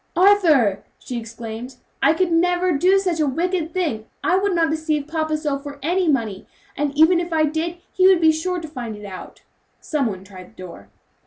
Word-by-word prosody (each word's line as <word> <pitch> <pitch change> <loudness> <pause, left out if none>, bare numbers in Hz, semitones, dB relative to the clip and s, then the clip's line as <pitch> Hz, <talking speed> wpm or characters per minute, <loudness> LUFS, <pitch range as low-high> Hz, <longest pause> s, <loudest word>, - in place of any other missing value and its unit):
"Arthur!" 335 - +4
she 245 -2 -6
exclaimed, 230 +2 -8 0.3
"I 280 +3 +5
could 365 0 0
never 355 +2 +2
do 360 +6 +3
such 360 -4 -1
a 305 - +2
wicked 335 +3 -1
thing! 300 -13 -2 0.2
I 360 - +2
would 390 0 +1
not 325 -2 +2
deceive 310 -2 -1
papa 315 -1 -1
so 295 -2 -2
for 285 0 -9
any 355 +3 +1
money; 225 -10 -1 0.3
and 290 0 -1
even 330 +3 +5
if 345 0 -4
I 320 -1 +2
did 320 +3 -2 0.2
he 370 0 +4
would 380 -2 +5
be 320 -1 +5
sure 355 +3 -2
to 325 - -7
find 245 -7 -6
it 210 0 -10
out." 190 -2 -10 0.4
Some 290 -5 -1
one 190 -3 -5
tried 185 -2 -12
the 185 - -11
door. 100 - -11
315 Hz, 200 wpm, -21 LUFS, 245-350 Hz, 0.4 s, I